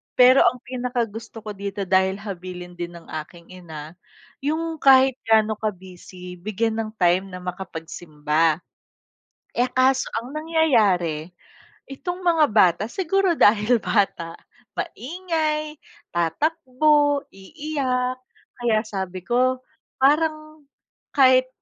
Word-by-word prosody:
pero 255 Hz, +1 st, +7 dB
ang 250 Hz, +1 st, +1 dB
pinakagusto 235 Hz, -3 st, -4 dB
ko 215 Hz, -, -5 dB
dito, 200 Hz, 0 st, -5 dB
dahil 190 Hz, 0 st, +2 dB
habilin 180 Hz, -3 st, -7 dB
din 175 Hz, 0 st, -5 dB
ng 170 Hz, -, -12 dB, 0.2 s
aking 170 Hz, +2 st, -18 dB
ina, 160 Hz, -4 st, -9 dB, 0.5 s
yung 320 Hz, +2 st, -2 dB
kahit 265 Hz, -1 st, +5 dB
ga'no 220 Hz, -1 st, +3 dB
ka-busy, 180 Hz, -3 st, -7 dB
bigyan 220 Hz, +3 st, -2 dB
ng 215 Hz, -1 st, -3 dB
time 185 Hz, 0 st, +2 dB
na 180 Hz, -1 st, -9 dB
makapagsimba. 165 Hz, -3 st, -2 dB, 0.9 s
Eh, 245 Hz, +1 st, +1 dB
kaso 260 Hz, +1 st, +2 dB
ang 245 Hz, +4 st, -5 dB
nangyayari, 220 Hz, -, +1 dB, 0.6 s
itong 355 Hz, +7 st, -5 dB
mga 335 Hz, -4 st, +3 dB
bata, 185 Hz, -3 st, +4 dB
siguro 380 Hz, +5 st, +1 dB
dahil 225 Hz, -3 st, +4 dB
bata, 170 Hz, -6 st, 0 dB, 0.4 s
maingay, 310 Hz, -, -3 dB, 0.3 s
tatakbo, 290 Hz, -, +1 dB
iiyak, 255 Hz, +2 st, -3 dB, 0.4 s
kaya 225 Hz, -2 st, +1 dB
sabi 190 Hz, -3 st, -5 dB
ko, 255 Hz, +3 st, +1 dB, 0.3 s
parang 310 Hz, +1 st, +1 dB, 0.5 s
kahit 255 Hz, -2 st, +5 dB
225 Hz, 105 wpm, -23 LUFS, 185-280 Hz, 0.9 s, pero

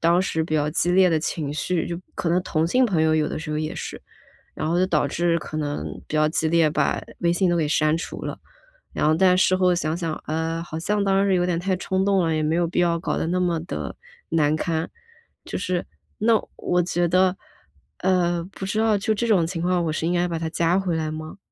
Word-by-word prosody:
当 170 Hz, +2 st, +4 dB
时 160 Hz, -3 st, -1 dB
比 160 Hz, -, -5 dB
较 150 Hz, 0 st, +1 dB
激 175 Hz, +3 st, +1 dB
烈 185 Hz, +1 st, +5 dB
的 160 Hz, -2 st, +1 dB
情 150 Hz, -2 st, -3 dB
绪， 170 Hz, +2 st, -1 dB
就 170 Hz, -, -3 dB, 0.2 s
可 170 Hz, -, -1 dB
能 175 Hz, +2 st, +2 dB
同 160 Hz, -3 st, 0 dB
性 255 Hz, +9 st, +3 dB
朋 190 Hz, -9 st, +1 dB
友 160 Hz, 0 st, +3 dB
有 155 Hz, -1 st, +1 dB
的 -, -, -4 dB
时 160 Hz, +1 st, -7 dB
候 -, -, -1 dB
也 155 Hz, 0 st, -2 dB
是。 -, -, -6 dB, 0.5 s
然 -, -, -3 dB
后 170 Hz, -, +1 dB
就 185 Hz, -, +3 dB
导 155 Hz, -6 st, +1 dB
致 170 Hz, +4 st, +1 dB
可 155 Hz, -, -6 dB
能 145 Hz, -1 st, -2 dB, 0.2 s
比 -, -, -9 dB
较 155 Hz, 0 st, +3 dB
激 160 Hz, 0 st, 0 dB
烈， 165 Hz, -1 st, +3 dB
把 150 Hz, -1 st, 0 dB, 0.2 s
微 170 Hz, -1 st, +2 dB
信 180 Hz, +1 st, +2 dB
都 175 Hz, -, +2 dB
给 160 Hz, -3 st, +1 dB
删 155 Hz, +1 st, +2 dB
除 165 Hz, -, -6 dB
了。 -, -, -5 dB, 0.5 s
然 -, -, +1 dB
后， 155 Hz, -, +4 dB
但 180 Hz, +2 st, +4 dB
事 185 Hz, 0 st, +3 dB
后 185 Hz, -1 st, +3 dB
想 165 Hz, -2 st, -1 dB
想， 165 Hz, -3 st, -2 dB
呃， 160 Hz, +1 st, -2 dB
好 165 Hz, -2 st, -6 dB
像 205 Hz, +5 st, 0 dB
当 195 Hz, 0 st, +2 dB
时 195 Hz, -, +2 dB
有 180 Hz, -1 st, +2 dB
点 175 Hz, -1 st, 0 dB
太 190 Hz, +1 st, 0 dB
冲 190 Hz, +1 st, -1 dB
动 195 Hz, -2 st, +3 dB
了， 165 Hz, -1 st, +1 dB
也 155 Hz, -, 0 dB
没 155 Hz, +2 st, +1 dB
有 170 Hz, 0 st, +1 dB
必 170 Hz, -, -2 dB
要 170 Hz, -1 st, +2 dB
搞 170 Hz, -, -2 dB
得 -, -, -1 dB
那 180 Hz, +2 st, 0 dB
么 175 Hz, -2 st, +1 dB
地 175 Hz, -, -5 dB, 0.3 s
难 155 Hz, -2 st, +2 dB
堪， 160 Hz, +1 st, -1 dB, 0.6 s
就 -, -, -5 dB
是 180 Hz, -1 st, -1 dB, 0.4 s
那 225 Hz, +2 st, +4 dB, 0.2 s
我 180 Hz, 0 st, +1 dB
觉 175 Hz, 0 st, 0 dB
得， 185 Hz, +2 st, +3 dB, 0.6 s
呃， 175 Hz, -2 st, +1 dB
不 195 Hz, -, -9 dB
知 215 Hz, +2 st, -1 dB
道 220 Hz, -1 st, +3 dB
就 205 Hz, +3 st, -1 dB
这 235 Hz, +3 st, -1 dB
种 185 Hz, -7 st, +3 dB
情 170 Hz, 0 st, -4 dB
况， 180 Hz, -1 st, +1 dB
我 160 Hz, -, 0 dB
是 155 Hz, -, -2 dB
应 170 Hz, -, +1 dB
该 175 Hz, 0 st, +1 dB
把 170 Hz, -1 st, -3 dB
他 160 Hz, 0 st, -3 dB
加 170 Hz, +3 st, +1 dB
回 185 Hz, -3 st, -1 dB
来 160 Hz, -1 st, -1 dB
吗？ 155 Hz, +2 st, -7 dB
170 Hz, 270 characters per minute, -23 LUFS, 160-185 Hz, 0.6 s, 烈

